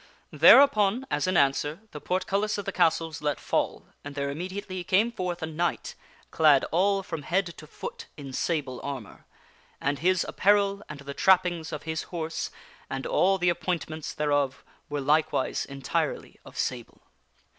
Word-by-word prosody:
" - - -35
Thereupon, 245 -3 +6
as 150 +5 0
in 185 -1 +2
answer, 145 +5 +1
the 150 - -8
portcullis 195 +3 -1
of 205 - -5
the - - -2
castle 165 0 +2
was 160 - -8
let 150 -1 -1
fall, - - -1 0.2
and 145 0 -8
there 140 0 -2
immediately 185 +3 -5
came 205 +7 +2
forth 180 -5 -4
a - - +1
knight, 165 +2 -2 0.4
clad 150 -4 +5
all 195 +3 +2
from 165 -4 -5
head 175 +4 -1
to 155 - -11
foot - - -8
in 140 -3 -8
sable 140 -5 -2
armor. 135 -7 -7 0.5
And 140 0 -1
his 180 +3 +2
apparel 200 0 +2
and 145 -2 -8
the 140 0 -7
trappings 175 -2 +2
of 150 -2 -5
his 160 0 -3
horse 165 -2 -3 0.4
and 135 0 -4
all 195 +1 +3
the 180 -1 +2
ap 170 - -5
pointments 160 -4 -3
thereof 145 -2 0 0.3
were 145 -1 -2
likewise 150 -1 +1
entirely 135 -2 -3
of - - -13
sable. 120 -2 -4
160 Hz, 165 wpm, -27 LUFS, 145-185 Hz, 0.5 s, Thereupon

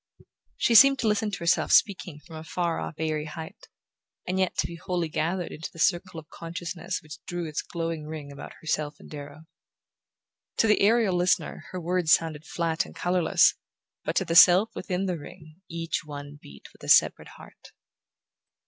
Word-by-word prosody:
She 235 - +2
seemed 275 +4 +8
to 235 - -1
listen 210 0 +1
to 200 - -4
herself 170 +1 +1
speaking 180 -6 +2
from 165 -1 -11
a 155 - -7
far 170 0 -2
off - - -5
airy 155 -1 -2
height, 160 +1 -9 0.6
and 185 +1 -1
yet 185 -1 0
to - - +1
be 170 - -6
wholly 175 -1 -2
gathered 170 +4 -2
into 160 - -7
the - - -16
circle 175 +1 0
of 155 - -14
consciousness 170 +2 -5
which 150 -1 -11
drew 175 -1 -3
its 155 -1 -3
glowing 165 -2 -4
ring 155 -2 -7
about 140 +1 -9
herself 150 -2 -2
and - - -15
Darrow. 145 +1 -9 1.1
To - - +3
the 210 -1 +3
aerial 215 -2 +3
listener 180 +1 0
her 185 - -5
words 175 -2 +2
sounded 160 -1 0
flat 165 -1 -1
and - - -13
colourless, 175 -2 +3 0.5
but - - -3
to 190 - +1
the 165 - -2
self 180 +5 +7
within 185 0 -3
the 180 -3 -2
ring 155 +2 -13
each 165 -1 -3
one 145 -1 -9
beat 70 -1 -14
with - - -20
a - - -6
separate - - +4
heart. - - -15
170 Hz, 185 wpm, -26 LUFS, 155-185 Hz, 1.1 s, seemed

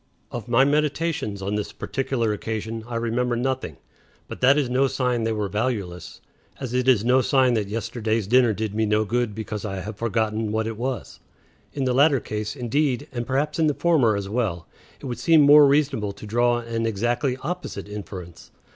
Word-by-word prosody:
Of 120 -1 -6
my 120 +3 +4
meditations 150 -7 -1
on 100 +2 -2
this 105 -1 -2
particular 125 -5 -2
occasion 110 +1 -4
I 120 - -5
remember 120 +1 0
nothing; 125 - -2 0.5
but - - -9
that 135 +3 +5
is 145 -3 +1
no 130 +2 +2
sign 125 -3 -1
they 115 - 0
were 105 -2 -1
valueless; 100 -5 -3 0.4
as 130 -3 -5
it 125 0 0
is 120 -5 +4
no 130 +2 +4
sign 130 -1 +3
that 110 -4 0
yesterday's 110 0 -2
dinner 120 +2 +4
did 110 0 -3
me 110 0 0
no 105 +1 +2
good 120 -1 -1
because 110 -1 -5
I 95 -3 -4
have 105 +2 -7
forgotten 110 -1 -1
what 110 0 0
it 115 0 -4
was. 125 +1 -4 0.5
In 140 - -2
the 125 - +1
latter 140 +1 +4
case, 105 +1 -4
indeed, 130 0 -1
and 120 -1 -4
perhaps 145 +4 -1
in 160 - +4
the 150 - +1
former 145 -11 +3
as 100 -1 -3
well, 100 -6 -2 0.3
it - - -11
would 120 -3 -4
seem 160 +4 +5
more 145 0 +8
reasonable 135 -8 +1
to 105 - -11
draw 120 +3 +2
an 115 -1 -2
exactly 120 +4 0
opposite 175 - -5
inference. 95 -4 -9
115 Hz, 190 wpm, -24 LUFS, 105-130 Hz, 0.5 s, more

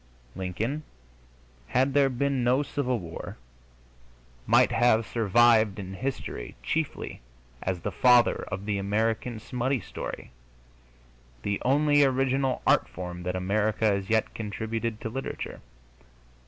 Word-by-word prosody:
Lincoln, 110 - -3 0.9
had 130 +2 +2
there 140 -1 +4
been 135 0 0
no 125 +4 +3
Civil 130 -3 -1
War, 85 -5 -7 1.1
might - - +5
have 115 -2 +3
survived 115 -1 +4
in 95 -2 -6
history 130 - -5
chiefly 160 -1 -3 0.4
as 90 -2 -2
the - - -3
father 125 -1 +5
of 100 0 -5
the 105 -2 -1
American 110 +3 -1
smutty 125 +3 -1
story 90 - -7 1.1
the 100 0 -1
only 145 +2 +4
original 135 0 +1
art 60 - +4
form 90 +5 -6
that 90 +1 -3
America 105 +4 0
has 100 -2 +1
yet 110 -1 +1
contributed 110 +1 -3
to 110 - -3
literature. 135 +4 -5
115 Hz, 120 wpm, -27 LUFS, 100-130 Hz, 1.1 s, might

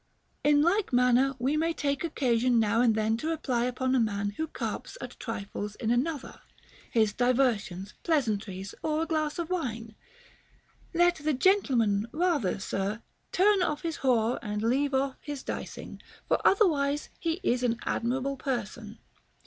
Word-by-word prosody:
In 295 0 +5
like 380 +3 +2
manner 250 +2 +3
we 265 +4 0
may 330 +2 +1
take 280 0 -1
occasion 250 -6 +2
now 225 +1 +2
and 230 -3 +4
then 220 +1 +1
to 305 - -4
reply 260 -7 0
upon 255 +1 -1
a 260 - +4
man 205 -3 0
who 315 +10 -3
carps 405 - -5
at - - -8
trifles 210 -2 -5
in 230 -2 -1
another, 275 +4 -2 0.3
— - - -24
his 220 -3 +2
diversions, 235 -7 0
pleasantries, 210 - -1
or 310 0 0
a - - -2
glass 310 -2 -1
of 340 0 -4
wine, 230 -10 -3 0.5
— - - -33
Let 350 +1 +4
the 305 0 0
gentleman 245 - +2
rather, 320 - +1
sir, 195 +3 -3 0.3
turn 395 +1 +4
off 310 -3 -1
his 330 -3 -2
whore 240 -3 +2
and 210 -1 -3
leave 270 +4 +1
off 270 0 0
his 290 -3 -6
dicing; - - -6 0.3
for - - +2
otherwise 295 -8 +3
he 335 0 -1
is 245 0 +1
an 235 -2 +1
admirable 265 +4 -1
person. 235 -4 -4
255 Hz, 160 wpm, -28 LUFS, 225-305 Hz, 0.5 s, In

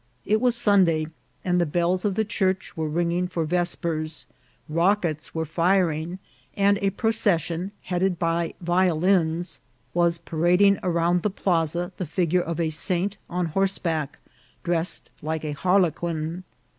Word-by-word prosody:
It 215 +2 +2
was 250 -1 +2
Sun 205 -5 +4
day, 160 -2 +1 0.4
and 180 -1 +2
the - - +2
bells 175 +4 0
of 200 -2 +1
the 220 - +1
church 190 -3 -1
were 160 -2 -2
ringing 175 +3 0
for 175 -3 -2
ves 175 +2 +1
pers, 155 -2 -3 0.4
rockets 170 -1 0
were 160 0 -1
firing, 170 0 +1 0.4
and 200 0 +3
a 200 - +1
procession, 195 -5 0
headed 180 0 0
by 165 -1 -1
violins, 175 -1 +1 0.3
was 170 -1 +2
parading 175 +4 +3
round 175 0 +1
the 210 - +1
plaza 175 -2 0
the 180 - -3
figure 175 +2 +1
of 170 0 -4
a 160 -2 0
saint 185 +5 -1
on 180 0 -1
horseback, 165 -6 -1 0.5
dressed 170 0 -1
like 160 0 -3
a 150 - -2
harlequin. 170 0 0
175 Hz, 145 wpm, -25 LUFS, 165-190 Hz, 0.5 s, Sun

